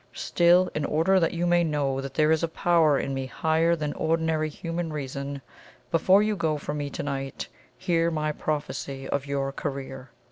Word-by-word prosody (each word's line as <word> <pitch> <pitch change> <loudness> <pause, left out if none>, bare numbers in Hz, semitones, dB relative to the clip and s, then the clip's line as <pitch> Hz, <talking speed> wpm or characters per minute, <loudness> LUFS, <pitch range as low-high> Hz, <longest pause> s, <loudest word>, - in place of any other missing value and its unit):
Still, 175 +1 +3
in 150 - -2
order 165 +6 +3
that 165 - +1
you 170 +1 0
may 175 0 +3
know 140 -4 0
that 135 -1 -7
there 155 0 +3
is 160 - +3
a 165 - +1
power 160 -3 +3
in 135 - -2
me 135 -1 -3
higher 160 +5 +1
than 150 -2 -3
ordinary 160 -1 0
human 165 +2 -4
reason, 140 -1 -5 0.5
before 185 +5 +5
you 215 0 0
go 160 -4 0
from 145 +1 -4
me 145 -1 -3
to - - -5
night 135 -2 -4 0.3
hear 165 +4 +1
my 155 -2 -1
prophecy 145 -3 -4
of 140 0 -2
your 140 -1 -1
career. 135 -2 -6
155 Hz, 185 wpm, -26 LUFS, 140-165 Hz, 0.5 s, before